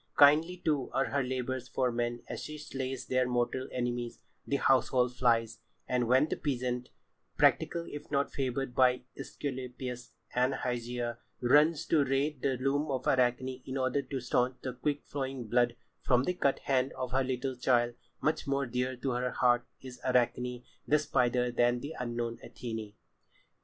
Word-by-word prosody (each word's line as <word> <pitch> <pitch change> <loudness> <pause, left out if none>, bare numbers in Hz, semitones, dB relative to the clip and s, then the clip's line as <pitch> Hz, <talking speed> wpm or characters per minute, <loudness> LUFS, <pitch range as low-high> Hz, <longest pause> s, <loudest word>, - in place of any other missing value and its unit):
Kindly, 155 +5 +6
too, 150 -6 0
are 135 - +2
her 140 - +1
labours 130 0 -3
for 125 0 0
men 120 0 -2
as - - -5
she 155 0 -6
slays 135 -3 -4
their 130 -1 +1
mortal 125 +1 0
enemies, 120 -1 -2 0.3
the 140 - +1
household 125 -2 +3
flies, 115 -3 +2 0.3
and 125 -2 +1
when 130 +5 +5
the - - -2
peasant—practical, 125 +5 -1
if 145 +1 -8
not 140 0 +1
favoured 135 -1 -2
by 125 0 +4
Æsculapius 125 -3 -5 0.2
and 125 +2 +2
Hygeia—runs 125 +5 +1
to 155 -3 +3
raid 135 +1 0
the 135 -2 +1
loom 140 +4 0
of 130 -2 -2
Arachne 130 0 +1
in 130 +1 -4
order 130 +2 +1
to 135 0 -4
staunch 125 +1 +1
the 130 - -3
quick 145 +4 -2
flowing 135 -4 -4
blood 120 +1 +2 0.3
from 125 -1 +3
the 180 - 0
cut 140 -6 +1
hand 130 -1 +1
of 125 -2 -4
her 135 +1 +2
little 130 0 -2
child, 120 -1 +2 0.3
much 155 0 0
more 140 0 +1
dear 125 +1 -1
to 130 +2 -2
her 125 +1 0
heart 120 -1 +2
is 130 -1 -10
Arachne 125 0 +1 0.2
the 150 - +5
spider 125 -4 +1
than 120 0 +2
the 145 +5 -6
unknown 120 -1 -3
Athené. 110 -3 -6
130 Hz, 160 wpm, -31 LUFS, 125-135 Hz, 0.3 s, Kindly